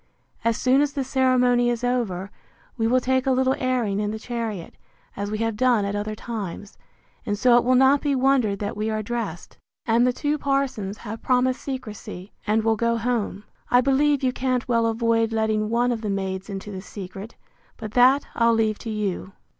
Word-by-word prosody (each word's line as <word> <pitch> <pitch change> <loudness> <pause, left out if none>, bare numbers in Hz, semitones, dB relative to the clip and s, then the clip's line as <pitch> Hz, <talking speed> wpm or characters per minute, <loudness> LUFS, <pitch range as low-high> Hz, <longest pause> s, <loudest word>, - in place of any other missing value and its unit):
As 230 0 +1
soon 260 +2 +3
as 290 -1 0
the 275 - -1
ceremony 250 -2 +3
is 240 0 -2
over, 205 -7 -1 0.4
we 225 -2 0
will 255 +2 +3
take 260 +1 0
a - - +4
little 260 0 +2
airing 245 -6 0
in 210 0 -1
the 215 - -3
chariot, 220 -6 -5 0.4
as 200 0 -3
we 215 - -2
have 225 0 -1
done 235 -3 +2
at 200 +1 -2
other 210 +1 -3
times; 205 -4 -6 0.5
and 205 -1 -2
so 245 +2 +5
it 240 - +5
will 255 +1 +3
not 265 +2 +5
be 285 -2 +1
wondered 255 -6 +2
that 205 0 -4
we 215 +1 -2
are 215 0 -2
dressed. 235 +2 -5 0.3
And 235 +1 +3
the - - +3
two 295 +4 -1
parsons 270 -8 -1
have 225 0 -7
promised 255 0 +1
secrecy, 215 -7 -7 0.2
and 215 +1 +2
will 225 0 +2
go 235 +1 +1
home. 230 -3 -2 0.3
I 245 - +5
believe 280 +1 +2
you 255 -1 +1
can't 255 -1 -1
well 230 -2 +2
avoid 225 0 +1
letting 220 -1 0
one 240 +2 +2
of 230 -2 -2
the 215 - -3
maids 190 0 -3
into 195 +1 -6
the 190 -1 -6
secret; 195 +2 -9 0.4
but 215 -3 -7
that 255 +4 +5
I'll 230 -1 +3
leave 220 -2 +1
to 230 - -6
you. 200 -3 -3
230 Hz, 200 wpm, -24 LUFS, 210-255 Hz, 0.5 s, so